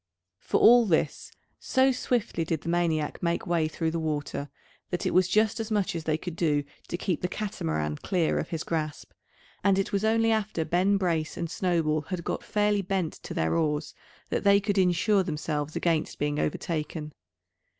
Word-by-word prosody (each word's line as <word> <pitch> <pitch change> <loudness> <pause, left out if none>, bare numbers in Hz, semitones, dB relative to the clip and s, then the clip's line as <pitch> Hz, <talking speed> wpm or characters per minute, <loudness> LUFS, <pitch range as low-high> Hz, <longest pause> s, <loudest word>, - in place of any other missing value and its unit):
For - - 0
all 240 0 +7
this, 160 -4 0 0.3
so 260 +1 +3
swiftly 240 -8 -1
did 160 -2 -2
the - - -5
maniac 165 -3 0
make 170 0 0
way 170 -3 +1
through 160 +1 -2
the 165 - -2
water, 145 -2 -3 0.4
that 180 - -2
it - - 0
was 185 -1 +4
just 215 +3 +2
as 225 0 -3
much 205 -5 0
as 165 -2 -4
they 155 -1 +1
could 175 0 -6
do 150 -4 +1 0.2
to 175 - -3
keep 180 -2 -2
the 180 - 0
Catamaran 80 - -3
clear 175 -4 0
of - - -4
his 160 -2 -3
grasp; 155 -3 -3 0.5
and 195 -1 +4
it 195 - 0
was 200 +1 +1
only 225 +1 +3
after 215 -7 0
Ben 185 +4 +2
Brace 165 -5 -1
and 170 -2 -3
Snowball 165 -4 +1
had 180 -3 -3
got - - -3
fairly 210 -1 +1
bent 190 -3 -1
to - - -7
their 80 0 +1
oars, 150 -2 0 0.4
that - - -1
they 200 0 +6
could 205 -1 0
insure 190 +3 +3
themselves 150 -3 -3
against 165 -3 0
being 145 0 -1
overtaken. 155 -1 -3
170 Hz, 185 wpm, -27 LUFS, 155-200 Hz, 0.5 s, all